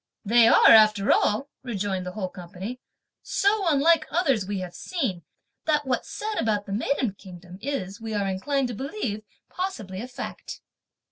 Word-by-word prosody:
"They 230 +2 +6
are, - - +7
after 215 -2 +6
all," 220 +7 +2
rejoined 200 -6 -3
the 180 - -5
whole 190 -3 -3
company, 185 +7 -8 0.4
"so 400 -1 +1
unlike 310 +1 +4
others 275 - +1
(we 205 0 -2
have 180 -2 -5
seen), 255 - -3 0.4
that 300 -2 +1
what's 260 -1 -2
said 430 0 -3
about 210 -2 0
the 195 - -5
maiden 240 0 0
kingdom 180 -1 -12
is, 225 -7 -4
we 220 -1 -4
are 200 -1 0
inclined 255 +8 -1
to - - -4
believe, 255 - -4 0.3
possibly 220 - -4
a 245 - -6
fact." 250 - -7
220 Hz, 160 wpm, -25 LUFS, 195-280 Hz, 0.4 s, are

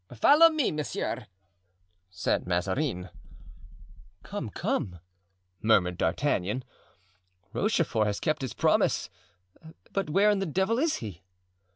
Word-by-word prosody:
"Follow 300 - +7
me, 310 -5 0
monsieur," 150 -1 -3 0.8
said 90 - -1
Mazarin. 90 - -1 1.1
"Come, 200 - -5
come," 90 -3 -2 0.6
murmured 90 -5 +3
D'Artagnan, 105 - 0 0.9
"Rochefort 165 - +1
has 100 -1 -2
kept 155 -1 -1
his 130 -5 -4
promise, - - +2 0.8
but 195 -5 -2
where 200 +6 +4
in 205 - +1
the 195 - -2
devil 190 - +1
is 315 +2 +2
he?" 95 -5 -8
145 Hz, 105 wpm, -28 LUFS, -, 1.1 s, Follow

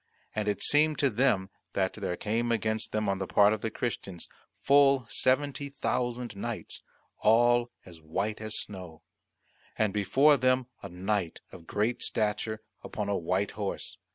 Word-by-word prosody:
And 105 -1 -2
it 105 -1 0
seemed 150 +1 +3
to 140 -2 +2
them 105 -5 +1 0.2
that 95 -1 0
there 95 -4 -3
came 115 +3 -1
against 110 -1 -1
them 110 -1 -1
on 95 -1 0
the 95 - -3
part 105 +3 +5
of 110 - -4
the 115 - -1
Christians 100 -6 -4 0.3
full 140 -2 +4
seventy 140 +2 +1
thousand 125 -4 -2
knights, 115 +3 -5 0.4
all 120 +2 +4 0.2
as 85 -3 -12
white 95 +8 -3
as 110 0 -3
snow: 90 -5 -7 0.7
and 110 -3 +1
before 135 +9 +4
them 130 0 +2 0.2
a - - -7
knight 95 0 -2
of 85 -3 -13
great 110 +4 0
stature 110 0 -1 0.2
upon 105 -2 -4
a 100 - +1
white 95 +4 0
horse. 100 -2 -5
110 Hz, 155 wpm, -29 LUFS, 100-120 Hz, 0.7 s, part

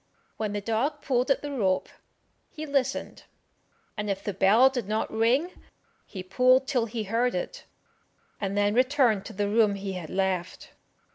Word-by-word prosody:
When 215 -2 -2
the 205 - -2
dog 260 +8 -1
pulled 250 0 0
at 275 - +2
the 290 - -4
rope, 195 -9 0 0.6
he 310 0 -7
listened, 280 -3 -2 0.7
and 210 -1 -3
if 195 0 -2
the 205 - -3
bell 205 +7 +5
did 250 -6 -2
not 215 +1 -2
ring, 245 +10 +2 0.6
he 190 -3 -7
pulled 255 +7 +3
till 245 -4 0
he 225 0 -4
heard 230 +4 0
it, - - -5 0.7
and 200 0 -2
then 205 0 +2
returned 255 -4 +2
to - - -8
the 205 0 -1
room 210 -1 +3
he 195 0 -5
had 175 -4 -6
left. 190 -2 -2
220 Hz, 165 wpm, -27 LUFS, 200-260 Hz, 0.7 s, bell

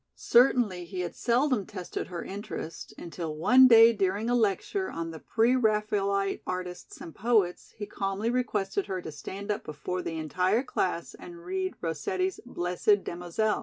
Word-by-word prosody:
Certainly 235 -7 +3
he 180 +1 -5
had 175 - -4
seldom 245 -3 +1
tested 185 -4 -5
her 175 -2 -5
interest 190 -5 -7
until 165 -2 -6
one 255 +11 +7
day 230 -1 +8
during 205 +3 0
a - - +3
lecture 240 - 0
on 165 0 -4
the 160 - -9
Pre 235 +8 +2
Raphaelite 210 -4 +1
artists 180 -1 -5
and 165 - -9
poets 210 -5 0
he 205 - -4
calmly 200 +2 -2
requested 205 -6 -1
her 190 -2 -3
to 160 - -6
stand 200 +7 -6
up 205 - -3
before 155 +5 -4
the 165 -2 -4
entire 180 - +1
class 180 -9 -2
and 170 -1 -12
read 185 +1 -2
Rossetti's 185 +4 -2
"Blessed 180 0 +1
Damozel." 180 +5 -1
195 Hz, 160 wpm, -28 LUFS, 175-220 Hz, -, day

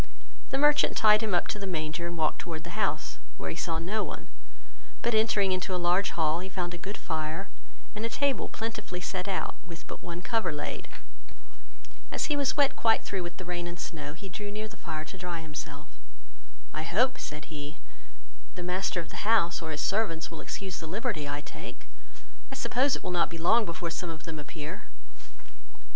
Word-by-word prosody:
The 270 - +1
merchant 295 +1 +6
tied 215 -1 +7
him 215 -5 +2
up 175 - +3
to 210 - -1
the 200 - -3
manger, 165 -1 -1
and 170 0 -4
walked 155 -1 +2
towards 160 -2 -4
the - - -7
house, - - 0 0.2
where 80 - -2
he - - -4
saw 165 -1 0
no 195 +6 +1
one, - - -6 0.7
but 235 - +3
entering 215 -3 +4
into 185 0 +1
a - - +2
large 180 +3 +4
hall, 160 0 +3
he 185 +2 -4
found 180 -2 -2
a - - -4
good 200 +4 -4
fire, 160 +3 -2 0.5
and 210 - -3
a 230 - +1
table 280 +2 +2
plentifully 220 -5 -3
set 180 +1 -2
out, 195 -1 0
with 170 -2 -8
but - - -7
one 175 +1 -5
cover 225 -6 +2
laid. 150 -1 -3 1.2
As 300 - +2
he - - +3
was 280 -1 +2
wet 285 -2 +5
quite 225 -1 +4
through 195 -2 -1
with 175 0 -5
the 185 - -6
rain 175 0 -2
and 175 0 -5
snow, 150 -5 -4
he 195 +5 -8
drew 205 +2 -4
near 215 +1 -3
the 215 - -12
fire 155 -2 -4
to 190 - -8
dry 175 -2 -2
himself. 155 -2 -5 0.9
"I 155 - -1
hope, 240 +11 +3
(said 150 +1 -5
he,) 150 +1 -5 0.8
the 180 - -4
master 180 0 +1
of 165 - -9
the - - -7
house, 205 -6 +4
or 160 - -3
his 150 -2 -1
servants, 195 -7 +1
will 165 - -6
excuse 190 -2 -4
the 160 - -5
liberty 185 - -1
I 145 +1 -1
take; - - -8 0.7
I - - -4
suppose 265 +1 +3
it - - -6
will - - -1
not 175 -3 +3
be 165 - -5
long 220 +8 +5
before 170 -1 -2
some 175 +1 -2
of 160 -2 -6
them 160 -1 -4
appear." 150 +4 -6
180 Hz, 205 wpm, -30 LUFS, 160-210 Hz, 1.2 s, tied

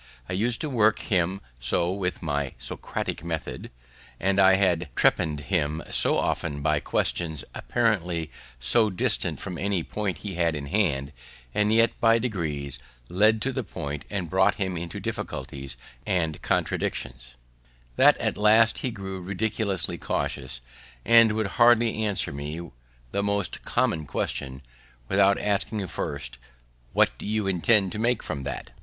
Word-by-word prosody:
I - - -4
used 115 +5 0
to 155 - -1
work 110 -3 +4
him 95 -1 0 0.2
so 85 +8 +1
with 95 -2 -3
my 70 -3 -2
Socratic - - -4
method, 80 -2 -5 0.5
and 95 +1 +1
had 95 -4 +4
trepann'd 75 -2 +2
him 80 -1 -1
so - - +3
often 70 -1 -1
by 75 -1 +2
questions 80 0 -1
apparently 90 - 0 0.3
so 110 - +4
distant 95 - +1
from 90 -4 -6
any 95 -4 0
point 105 0 -3
we 100 -2 -4
had 85 -2 +1
in 70 -1 -5
hand, 70 -6 0 0.4
and 105 0 +2
yet 115 0 +5
by 115 0 +5
degrees 75 - -2 0.3
led 110 +4 +3
to 135 - 0
the 130 -1 -3
point, 75 -7 -6
and 100 -4 -3
brought 95 +4 +3
him 95 -3 -2
into 85 0 -5
difficulties 65 -2 -5 0.3
and 80 -4 -1
contradictions, 60 -2 -2 0.6
that - - +6
at - - -1
last 110 +2 +5
he 130 - -2
grew 95 -4 -6
ridiculously 100 0 -2
cautious, 65 -2 -3 0.4
and 115 -2 +6
would 110 0 0 0.2
hardly 120 -2 +5
answer 100 -9 -1
me 75 +4 -6 0.4
the 100 - 0
most 100 0 -1
common 80 -3 0
question, 65 +1 -3 0.4
without 100 +3 +4
asking 105 0 +1
first, 70 -8 -5 0.5
"What - - +3
do - - -7
you 110 -1 0
intend 95 +1 +3
to 105 - -3
infer 120 -1 +1
from 70 - -4
that?" 65 - -6
95 Hz, 145 wpm, -26 LUFS, 75-105 Hz, 0.6 s, that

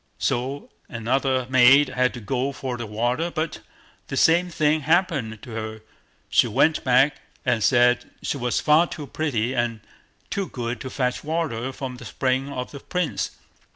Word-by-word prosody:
So 130 +4 -2 0.2
another 130 +2 0
maid 130 +2 +6
had 125 0 +1
to - - -6
go 130 +4 -1
for 130 -2 -4
the 120 -2 -5
water, 120 +10 -1
but 160 -2 -3 0.5
the - - -4
same 175 +2 +4
thing 155 -1 +2
happened 145 - 0
to 120 - -9
her; 110 -1 -5 0.5
she - - +4
went - - +2
back - - +4 0.3
and 110 - +1
said 125 0 +3
she - - -2
was 125 -2 0
far 155 +3 +4
too 150 -3 -7
pretty 130 -6 -1
and 120 -3 -1 0.5
too 195 -2 -1
good 120 -1 -4
to 130 - -5
fetch 125 -1 -2
water 145 -6 -2
from 130 -1 -6
the - - -11
spring 130 0 -1
for 130 -3 -4
the 140 - -10
Prince. 180 +2 -2
130 Hz, 165 wpm, -24 LUFS, 120-150 Hz, 0.5 s, maid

